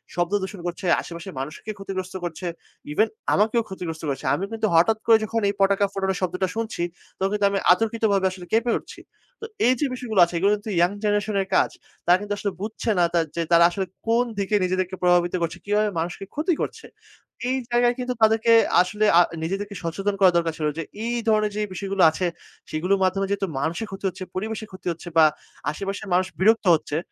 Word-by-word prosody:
শব্দ 175 +1 0
দূষণ 190 +1 -6
করছে, 175 +2 -5 0.2
আশেপাশের 170 +2 -8
মানুষকে 155 +10 -6
ক্ষতিগ্রস্ত 190 -1 -5
করছে, 175 +1 -5 0.5
ইভেন 215 +9 +3 0.3
আমাকেও 220 +3 +2
ক্ষতিগ্রস্ত 165 -4 -6
করেছে। 135 - -4
আমি 185 - -4
কিন্তু 220 -1 0
হঠাৎ 215 +7 +4
করে 225 -1 +7
যখন 225 +1 -1
এই - - -1
পটকা 200 +1 +3
ফোটানোর 190 -1 -1
শব্দটা 185 +1 0
শুনছি, 225 -6 -3 0.3
তখন 190 +1 0
কিন্তু 205 -1 +1
আমি 200 - 0
অতর্কিতভাবে 215 -1 +1
আসলে 185 -1 -9
কেঁপে 230 +2 +2
উঠছি। - - -13 0.4
তো - - -4 0.2
এইযে 255 +3 +2
বিষয়গুলো 235 -6 -2
আছে, 170 - -11
এগুলো 195 +4 +3
কিন্তু 210 +1 -7
ইয়াং 175 +2 +4
জেনারেশন 205 0 0
এর 190 - -4
কাজ। - - +4 0.4
তারা 175 +1 +6
কিন্তু 205 0 -3
আসলে 200 0 -2
বুঝছে 220 +2 -4
না - - +5
তা 170 - +4 0.2
যে 170 - 0
তারা 170 0 +7
আসলে 190 +2 -2 0.2
কোন 230 +2 +3 0.2
দিকে 200 +1 0
নিজেদেরকে 185 0 -1
প্রভাবিত 175 0 +3
করছে, 165 -1 -2
কিভাবে 210 +1 +2
মানুষকে 175 +4 -4
ক্ষতি 315 +5 0
করছে। - - -4 0.6
এই 260 - +1
জায়গায় 240 0 +3
কিন্তু 250 0 -2
তাদেরকে 225 +1 +4 0.3
আসলে 210 +4 0
আ - - +8 0.2
নিজেদেরকে 200 +4 -3
সচেতন 195 +5 -2
করা 190 -2 +6
দরকার 165 -1 0
ছিল। 155 - -1
যে 165 - -2 0.2
এই 240 +1 -1
ধরনের 215 -1 +3
যেই 210 0 -1
বিষয়গুলো 195 +1 -2
আছে, 180 +4 -2 0.4
সেগুলোর 180 +5 0
মাধ্যমে 195 +1 +1
যেহেতু 200 -1 -1
মানুষের 165 +10 -2
ক্ষতি 195 +1 -7
হচ্ছে, 185 +1 -8
পরিবেশের 220 +2 -4
ক্ষতি 185 -1 -10
হচ্ছে 170 +2 -9
বা 160 - +8 0.5
আশেপাশের 195 +5 -5
মানুষ 185 +1 +3
বিরক্ত 220 +3 +4
হচ্ছে। 150 -1 -3
195 Hz, 190 wpm, -24 LUFS, 180-215 Hz, 0.6 s, আ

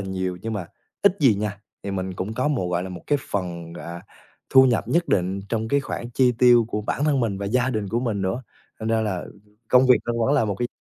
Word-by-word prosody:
nhiều 95 -2 -3
nhưng 115 0 -3
mà 100 -5 -4 0.4
ít 200 -1 +4
gì 125 -7 +5
nha 100 -1 -3 0.2
thì 100 - -4
mình 95 -1 -3
cũng 95 +5 -4
có 130 +5 0
một, 120 -12 -1
gọi 85 0 0
là, 95 - -5
một 90 -1 -8
cái 145 -1 +2
phần, 85 -4 -4
à, 85 0 -8 0.5
thu 130 0 +8
nhập 120 -3 +1
nhất 170 +1 +1
định 95 +1 +1
trong 110 0 -2
cái 140 0 +2
khoản 120 -2 -5
chi 125 0 +3
tiêu 120 -2 +6
của 105 - -2
bản 130 +6 -1
thân 145 -4 +2
mình 105 -5 -1
và 100 - -3
gia 125 +4 +1
đình 110 -4 -2
của 115 +5 0
mình 110 -6 -1
nữa. 95 +7 -2 0.4
Thành 110 - -3
ra 115 0 +2
là 100 -5 -2 0.4
công 130 +1 +5
việc 125 -4 +6
nó 120 - -1
vẫn 140 - +3
là 115 - +3
một 105 -2 -1
cái 120 +4 -2
110 Hz, 255 wpm, -23 LUFS, 95-125 Hz, 0.5 s, thu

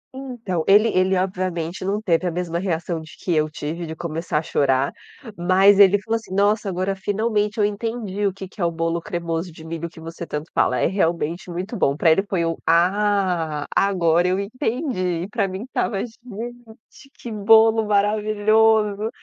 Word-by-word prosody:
Então, 240 -11 -4
ele 210 +3 +6
ele 185 0 +2
obviamente 185 -2 -2
não 200 +2 -1
teve 180 -4 +1
a 175 - -1
mesma 170 -1 -3
reação 170 -2 -2
de 160 - -13
que 180 - -2
eu 155 0 +1
tive 160 +2 -5
de 160 - -6
começar 165 -1 -3
a - - +1
chorar. 135 -2 +1 0.4
Mas 190 +3 +4
ele 200 0 +7
falou 225 +3 -1
assim: 220 -4 -8
"Nossa, 205 +1 +2
agora 185 +1 -1
finalmente 210 +2 -1
eu 205 - +4
entendi 210 -1 -2
o 195 - 0
que 190 0 -9
que 190 - -11
é 175 - +2
o - - +2
bolo 165 0 -2
cremoso 170 -2 -3
de 160 0 -13
milho 165 +1 -5
que 160 - -15
você 165 +1 -8
tanto 150 +2 -5
fala, 125 - +2
é - - +2
realmente 170 -2 -1
muito 185 +6 -5
bom". 140 -9 +1
Para 165 0 +4
ele 160 - +4
foi 170 -4 0
um: 165 - -1
"Ah, 180 -3 +1
agora 175 -3 +3
eu 185 +1 +1
entendi". 210 - -2
E - - -5
para 210 -2 0
mim 190 +2 -6
estava: 240 -4 -2
"Gente, 240 +3 -11
que 235 - -7
bolo 220 +1 +5
maravilhoso!". 215 +1 +2
190 Hz, 185 wpm, -22 LUFS, 170-210 Hz, 0.4 s, ele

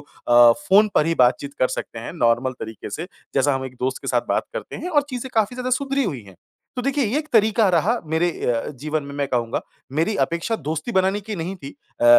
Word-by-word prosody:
अ, 120 -1 +5 0.2
phone 205 +3 +6
पर 150 - +4
ही 165 - +1
बातचीत 140 +3 0
कर 130 - +3
सकते 115 - -5
हैं 115 - -6
नॉर्मल 120 -3 +2
तरीक़े 110 -1 -7
से, 165 - -4 0.3
जैसा 140 +1 +3
हम 135 0 -3
1 130 -1 -7
दोस्त 130 +1 -1
के - - -8
साथ - - +2
बात - - +2
करते - - -6
हैं 360 - -5
और 300 -5 +3
चीज़ें 255 +1 -5
काफ़ी 220 +2 +1
ज़्यादा 255 0 -3
सुधरी 275 +1 +1
हुई 140 - -3
हैं। 95 -2 -15 0.4
तो 250 - -2
देखिए 275 +1 +1
ये 235 +7 0
1 305 0 -5
तरीक़ा 220 -1 +4
रहा 185 +7 +2
मेरे 170 +2 +3 0.2
अ, 115 -2 0
जीवन 155 +1 -1
में 140 0 -8
मैं 140 -1 -1
कहूँगा, 120 -2 -1 0.3
मेरी 165 +9 +1
अपेक्षा 170 +7 -2
दोस्ती 155 - -4
बनाने 190 +1 +2
की 215 +1 -6
नहीं 170 +3 -3
थी 140 -6 -9 0.3
अ - - +2
170 Hz, 230 wpm, -22 LUFS, -, 0.4 s, phone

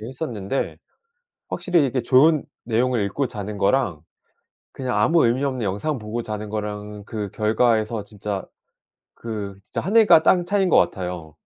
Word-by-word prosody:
예 110 - -7
했었는데 125 -4 -4 0.7
확실히 170 -6 +1
이게 130 0 -1
좋은 140 +5 +4 0.2
내용을 120 0 +1
읽고 135 +8 -1
자는 105 -2 -6
거랑 100 - +1 0.7
그냥 125 -5 -3
아무 160 +9 +4
의미 125 +4 +1
없는 130 -4 -2
영상 110 +9 -2
보고 110 +2 -4
자는 105 -1 -5
거랑은 105 -1 -5
그 105 -3 -5
결과에서 110 0 +1
진짜 105 -2 -5 0.7
그 105 -4 -6
진짜 - - -4
하늘과 205 -4 +5
땅 175 -2 +4
차이인 195 0 +1
것 - - +5
같아요. 90 -5 -1
110 Hz, 310 characters per minute, -23 LUFS, 105-135 Hz, 0.7 s, 하늘과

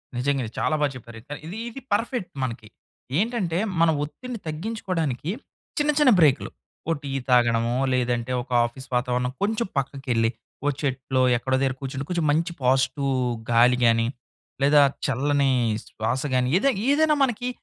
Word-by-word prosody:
నిజంగా. 135 +2 0
ఇది 110 - -8
చాలా 155 - +1
బా 145 - +4
చెప్పారయితే. 120 +4 -9
ఇది 185 +6 -6
ఇది 265 +3 -9
పర్ఫెక్ట్ 230 -1 -1
మనకి. 115 -3 -4 0.5
ఏంటంటే 205 -6 0 0.2
మనం 165 -1 +5
ఒత్తిడిని 240 - -7
తగ్గించుకోడానికి 165 - -3 0.5
చిన్న 295 +1 +3
చిన్న 290 -4 +6
బ్రేకులు, 150 -4 +4 0.4
ఓ - - +3
టీ 140 - -5 0.2
తాగడమో 120 -1 +3 0.2
లేదంటే 125 -1 0
ఒక 130 - -21
ఆఫీస్ 130 +3 -8
వాతావరణం 125 0 0
కొంచెం 220 +1 0
పక్కకెళ్ళి 130 -4 0 0.4
ఓ - - +2
చెట్లో 130 -1 -1 0.2
ఎక్కడో 130 +2 -1
దగ్గర 135 -1 +1
కూర్చుంటే 135 +1 -4
కొంచెం 170 -3 0
మంచి 165 +4 +1
పాజిటివ్ 130 +2 +2 0.4
గాలి 120 +2 +5
గాని, 115 0 +3 0.5
లేదా 145 +1 +6 0.2
చల్లని 140 +1 +1 0.4
శ్వాస 115 +4 -2
గాని 125 0 +2
ఏదై 275 +8 +3 0.2
ఏదైనా 305 +1 +4
మనకి 245 -1 -1
135 Hz, 145 wpm, -24 LUFS, 125-175 Hz, 0.5 s, చిన్న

